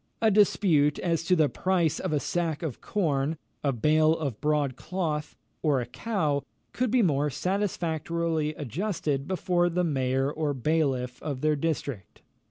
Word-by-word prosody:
A 220 -1 +4
dispute 180 -8 +4
as 170 -2 0
to 180 - +4
the 155 -3 +4
price 170 +3 0
of 185 - -2
a 150 - +2
sack 165 0 -2
of 155 -7 -4
corn, 155 -5 0 0.3
a 140 - +2
bale 155 +6 +3
of 140 -9 -4
broad 150 -3 +1
cloth, 155 -3 -3 0.2
or 145 -4 +2
a 120 - -2
cow, 150 - -1 0.3
could 255 0 0
be 245 0 +3
more 150 -4 +2
satisfactorily 170 -3 -1
adjusted 150 - -2
before 175 -1 +1
the 180 +1 0
mayor 135 -3 0
or 150 -2 -1
bailiff 130 -3 0
of 140 -4 -4
their 155 0 +2
district. 140 - -4
155 Hz, 155 wpm, -27 LUFS, 140-175 Hz, 0.3 s, A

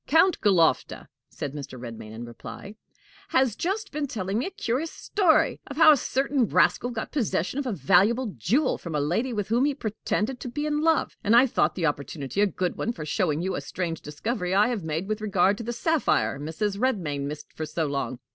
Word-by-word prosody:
"Count 325 +5 +4
Galofta," 180 -6 +2 0.2
said 145 - -5
Mr. 140 -3 -7
Redmain 115 -3 -8
in 115 +2 -7
reply, 120 - -9 0.6
"has 260 -5 +2
just 400 - -2
been 295 -1 -2
telling 200 -3 -2
me 255 - -1
a - - -3
curious 320 - -2
story 360 -7 +2
of 280 - -8
how 315 -1 +8
a - - +7
certain 270 -1 0
rascal 245 - +3
got 230 -2 -5
possession 255 - -1
of 280 - -2
a - - 0
valuable 205 - +3
jewel 240 - +1
from 170 -3 -6
a - - +1
lady 180 - 0
with 210 -4 -3
whom 235 +3 +3
he 290 -1 0
pretended 225 +1 -2
to 250 - -6
be 295 +5 -3
in 300 0 0
love, 325 0 +2
and 215 +3 +4
I 245 +3 +8
thought 255 - +1
the 175 - -1
opportunity 145 +3 -2
a 205 - +5
good 185 -2 -2
one 235 - -1
for 155 -8 -7
showing 160 -2 0
you 190 0 -1
a - - -3
strange 170 -3 -4
discovery 180 - -3
I 205 +4 +4
have 230 -7 -2
made 160 +4 -3
with 215 0 -2
regard 195 -2 +2
to - - -4
the 235 - -3
sapphire 235 - +1
Mrs. 195 +7 -2
Redmain 165 - -1
missed 150 +1 -8
for 155 - -5
so 160 0 -1
long. 140 -4 -2
210 Hz, 215 wpm, -26 LUFS, 160-260 Hz, 0.6 s, how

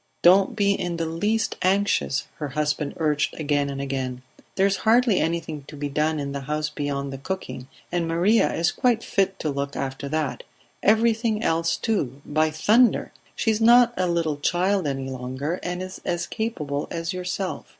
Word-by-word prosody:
"Don't 190 +6 +5
be 200 -1 +3
in 175 -3 -3
the 165 - -1
least 210 +8 -1
anxious," 190 -6 +1
her 150 - -3
husband 150 +1 -1
urged 150 -1 0
again 145 -2 0
and 135 -1 -5
again. 130 -2 -3 0.3
"There 190 - +3
is 195 0 +2
hardly 230 -1 +3
anything 160 -2 -2
to 150 - -11
be 145 0 -3
done 150 +2 0
in 140 -1 -3
the 140 - -3
house 150 +2 -2
beyond 140 -2 -3
the 135 - -6
cooking, 140 -5 -5 0.2
and 175 -1 0
Maria 180 +7 +3
is 170 +1 +1
quite 235 +1 +1
fit 195 -1 0
to 155 - -1
look 140 0 -3
after 135 +1 -4
that 155 -2 -2 0.4
everything 225 0 +2
else 165 0 +1
too, 145 - -1
by 155 +1 +1
thunder! 215 +10 +3 0.2
She 225 - +1
is 220 +1 -1
not 240 +1 +6
a 185 - 0
little 165 -3 0
child 180 +3 +1
any 135 -1 -3
longer, 130 +6 -4
and 180 +1 -3
is 185 0 -8
as 175 0 -1
capable 150 -11 -3
as 165 +2 -3
yourself. 185 +1 -4
165 Hz, 180 wpm, -24 LUFS, 145-195 Hz, 0.4 s, not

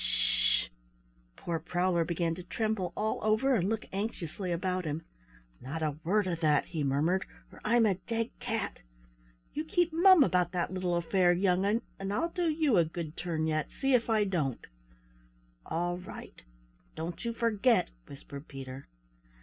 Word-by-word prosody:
"Sh - - +2
sh!" - - -10 0.7
Poor 170 -1 -3
Prowler 175 +1 +1
began 170 0 -1
to 175 - -7
tremble 210 0 -2
all 215 +1 0
over 220 +6 +3
and 195 -5 +2
look 220 -1 -2
anxiously 195 -3 -3
about 180 +2 -1
him. 155 0 -4 0.6
"Not 155 +5 -4
a 150 -1 -2
word 205 +4 +2
of 175 -3 -2
that," 155 -3 +3
he 160 -4 -3
murmured, 150 +7 +1 0.3
"or - - -14
I'm 230 +1 +4
a 205 - +4
dead 230 0 -1
cat! 225 -4 -3 0.7
You 305 - -2
keep 340 +1 +1
mum 355 -1 +7
about 180 -6 +1
that 180 +1 -1
little 180 -2 0
affair, 175 +1 +3
young'un, 190 +4 +2 0.2
and 195 0 -3
I'll 330 +12 0
do 345 -1 0
you 305 - +2
a 170 - +6
good 160 -1 -6
turn 165 -3 -2
yet, 155 -1 0
see 270 -1 +2
if 240 -2 +3
I 220 -2 +4
don't!" 160 - -1 1.0
"All 175 +1 -1
right; 180 - -10 0.5
don't 165 +2 -5
you 235 - -1
forget!" 230 -2 +2 0.2
whispered 140 +1 -10
Peter. 135 -1 -8
180 Hz, 165 wpm, -30 LUFS, 165-220 Hz, 1.0 s, mum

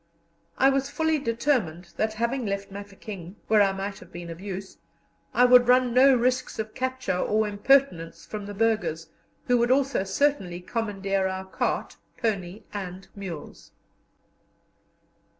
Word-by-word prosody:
I 270 - +5
was 275 0 0
fully 320 +1 +1
determined 230 - -1
that, 220 0 0
having 235 +4 -1
left 200 -2 -3
Mafeking, 200 -2 -8
where 215 -1 +5
I 195 -1 +4
might 195 +1 -5
have - - -15
been 175 -1 -7
of 165 +2 -9
use, 195 -1 -7 0.5
I 250 - +5
would 245 0 +7
run 250 -1 +4
no 265 +2 +7
risks 250 +1 0
of 220 -1 -4
capture 260 -5 -2
or 215 +2 +1
impertinence 205 -5 +2
from 210 -2 -6
the 205 - -7
burghers, 180 -8 0 0.4
who 245 -1 +3
would 240 +1 +2
also 270 -5 +2
certainly 195 -4 0
commandeer 195 -1 -1
our 190 0 -4
cart, 190 - -2 0.2
pony, 210 -4 -2
and 190 -2 -6
mules. 185 -6 -8
210 Hz, 145 wpm, -26 LUFS, 190-250 Hz, 0.5 s, would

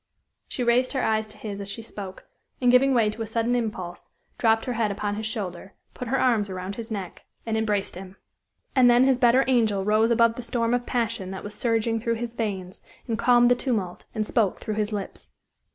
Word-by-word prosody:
She 250 - -3
raised 245 +3 +2
her 265 - 0
eyes 220 0 +1
to 215 0 -14
his 205 -2 -6
as 200 - -4
she 225 +3 -4
spoke, 195 -4 -8 0.3
and 250 -1 +4
giving 260 +1 +5
way 220 -3 +3
to 225 - -8
a 225 - -3
sudden 230 +2 0
impulse, 210 -7 -3 0.3
dropped 225 -1 +3
her 250 - -2
head 225 -2 0
upon 205 +1 -2
his 215 +1 -3
shoulder, 190 -4 -5 0.2
put 250 - -6
her 265 +3 +1
arms 230 -6 +2
around 185 +1 -5
his 225 +2 -7
neck, 195 -5 -6 0.2
and 225 -1 -1
embraced 210 -3 0
him. 185 +1 -9 0.6
And 255 -2 +6
then 240 +1 +6
his 260 -1 +3
better 255 +1 +5
angel 220 -6 +2
rose 215 +2 +3
above 230 0 +3
the - - -4
storm 235 -1 0
of 245 0 -1
passion 230 -5 -1
that 190 0 -6
was 205 - -6
surging 225 0 0
through 230 0 -1
his 235 0 -5
veins, 195 -5 -4 0.3
and 230 - 0
calmed 240 +1 +4
the - - +6
tumult, 215 -9 -2
and 215 -1 0
spoke 210 -4 +1
through 215 - -4
his 210 0 -1
lips. 205 -2 -5
225 Hz, 215 wpm, -25 LUFS, 205-240 Hz, 0.6 s, And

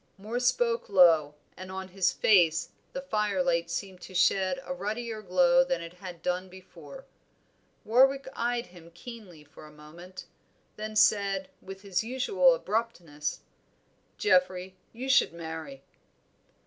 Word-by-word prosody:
Moor 215 +5 -4
spoke 245 -2 0
low, 165 -6 +5 0.2
and 185 0 -9
on 190 0 -6
his 185 0 +1
face 165 -6 +3 0.2
the 270 - -6
fire 210 -7 0
light 170 -1 0
seemed 185 +1 -5
to 185 - -11
shed 190 +6 +2
a 270 - -5
ruddier 225 -2 -4
glow 260 +7 +4
than 265 0 -2
it 170 0 -9
had 180 -2 -10
done 180 +1 -2
before. 190 - -13 0.8
Warwick 270 +5 +3
eyed 240 0 -1
him 175 -2 -15
keenly 200 -8 -11
for 155 +1 -15
a - - -15
moment, 170 +5 -12 0.5
then 215 0 -6
said, 195 -3 +2
with 195 +1 -10
his 195 0 -1
usual 275 - +3
abruptness 180 - -3 0.8
"Geoffrey, 190 - +1 0.2
you 250 +3 -7
should 265 -9 +4
marry." 160 -5 -8
195 Hz, 135 wpm, -28 LUFS, 175-235 Hz, 0.8 s, low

